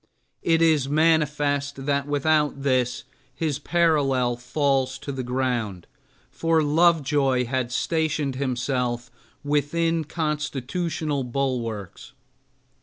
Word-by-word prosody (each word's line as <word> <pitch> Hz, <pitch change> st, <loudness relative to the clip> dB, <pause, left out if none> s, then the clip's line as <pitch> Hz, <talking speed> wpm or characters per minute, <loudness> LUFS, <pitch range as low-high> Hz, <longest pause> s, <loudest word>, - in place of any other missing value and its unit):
It 165 Hz, 0 st, +3 dB
is 155 Hz, -5 st, +3 dB
manifest 145 Hz, -3 st, +1 dB
that 140 Hz, 0 st, 0 dB
without 145 Hz, -1 st, +1 dB
this 130 Hz, -2 st, +1 dB, 0.3 s
his 150 Hz, -2 st, -1 dB
parallel 145 Hz, -7 st, +2 dB
falls 130 Hz, +1 st, 0 dB
to 140 Hz, -, -6 dB
the 135 Hz, -1 st, -4 dB
ground, 125 Hz, -7 st, -2 dB, 0.5 s
for 165 Hz, -1 st, +1 dB
Lovejoy 145 Hz, -5 st, +3 dB
had 125 Hz, 0 st, -2 dB
stationed 155 Hz, -1 st, 0 dB
himself 125 Hz, -2 st, -2 dB, 0.3 s
within 160 Hz, +3 st, 0 dB
constitutional 150 Hz, -1 st, -2 dB
bulwarks. 120 Hz, -6 st, -3 dB
140 Hz, 95 wpm, -24 LUFS, 130-155 Hz, 0.5 s, It